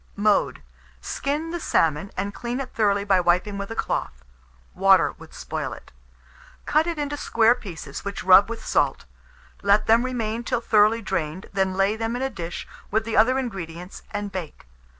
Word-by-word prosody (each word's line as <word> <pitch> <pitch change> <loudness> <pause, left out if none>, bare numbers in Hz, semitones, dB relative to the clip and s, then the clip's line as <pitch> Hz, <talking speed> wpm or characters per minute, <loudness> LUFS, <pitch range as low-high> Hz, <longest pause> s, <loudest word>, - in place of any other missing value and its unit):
Mode. 210 0 +1 0.4
Skin 295 - -3
the 345 - -3
salmon, 160 - +1
and 200 +1 -2
clean 240 +3 -4
it 270 - -6
thoroughly 200 -2 +2
by 195 -2 +3
wiping 180 +4 +1
with 200 - -5
a 225 - -5
cloth - - -3 0.5
(water 195 0 +4
would - - -13
spoil - - -5
it); - - -13 0.7
cut 310 +2 +2
it 340 -2 -2
into 290 0 -2
square 230 -4 +3
pieces, 165 - -8
which 200 0 -5
rub 190 +3 +7
with 230 -1 -6
salt; - - +1 0.6
let 200 +1 +3
them 225 +1 +5
remain 235 -3 -2
till 240 - -1
thoroughly 220 0 +3
drained, 160 0 -3
then 190 -1 0
lay 195 +2 +2
them 225 +1 -2
in 250 - -2
a 270 - -1
dish 175 -5 -6 0.2
with 220 +1 0
the 225 - -3
other 240 +5 +4
ingredients, 180 -8 -6
and 205 0 -4
bake. 180 -5 -7
205 Hz, 175 wpm, -24 LUFS, 190-235 Hz, 0.7 s, rub